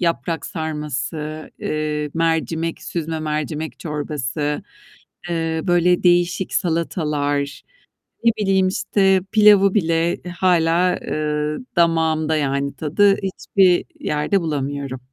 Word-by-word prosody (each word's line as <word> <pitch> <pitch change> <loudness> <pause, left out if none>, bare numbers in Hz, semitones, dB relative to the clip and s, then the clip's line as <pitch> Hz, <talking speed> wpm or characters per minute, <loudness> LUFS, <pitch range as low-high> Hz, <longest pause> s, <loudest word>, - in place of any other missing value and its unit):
yaprak 170 -1 -1
sarması, 155 -1 -4
eee, 150 -1 -2
mercimek 165 0 -1
süzme 160 -1 -3
mercimek 155 -2 -3
çorbası, 150 -1 -3 0.7
eee, 165 -1 -1
böyle 175 +1 +3
değişik 175 +1 +2
salatalar, 150 -5 -1 0.6
ne 230 - +5
bileyim, 190 -2 +2
işte, 190 0 +2
pilavı 210 -3 +6
bile 165 -3 +1 0.2
hâlâ, 180 0 +3
eee, 150 0 -2 0.2
damağımda, 160 -2 +2
yani 140 -1 -1
tadı, 195 +6 +3
hiçbir 190 -1 +2
yerde 150 +6 0
bulamıyorum. 140 -4 -3
160 Hz, 95 wpm, -21 LUFS, 150-175 Hz, 0.7 s, pilavı